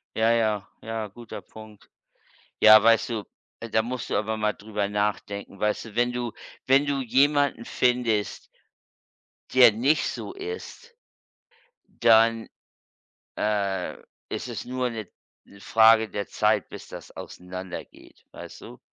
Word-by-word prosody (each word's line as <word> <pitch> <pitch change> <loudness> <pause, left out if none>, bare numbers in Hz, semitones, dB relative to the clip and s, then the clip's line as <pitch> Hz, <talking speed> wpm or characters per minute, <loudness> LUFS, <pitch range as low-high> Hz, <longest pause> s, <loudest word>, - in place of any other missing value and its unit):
Ja, 110 +1 +3
ja, 110 -3 +1
ja. 110 -1 -4
Guter 115 +3 -10
Punkt. 110 -1 -15 0.7
Ja, 110 0 +9
weißt 115 +1 +4
du, 110 -3 -3 0.4
äh, 115 - -7
da 110 +1 +2
musst 125 +2 -5
du - - -1
aber 110 +1 -2
mal 105 0 0
darüber 105 -1 -3
nachdenken. 100 -1 -3
Weißt 105 +2 -1
du, 110 - -12
wenn 120 +1 +2
du 120 -1 -3 0.3
wenn 135 +2 +4
du 140 -1 -1
jemanden 140 0 +2
findest 120 -4 0 1.1
der 130 -3 +8
nicht 130 +9 +1
so - - -6
ist 450 +4 -8 1.1
dann, 115 0 +5 0.9
äh, 100 -3 -1 0.3
ist - - -5
es - - -5
nur 125 0 -2
'ne 110 -4 -6 0.4
'ne 100 - -17
Frage 110 0 +5
der 100 -1 -4
Zeit, - - +1
bis - - -10
das - - -10
auseinandergeht. 90 0 -9
Weißt - - -10
du? - - -12
110 Hz, 135 wpm, -25 LUFS, 105-125 Hz, 1.1 s, Ja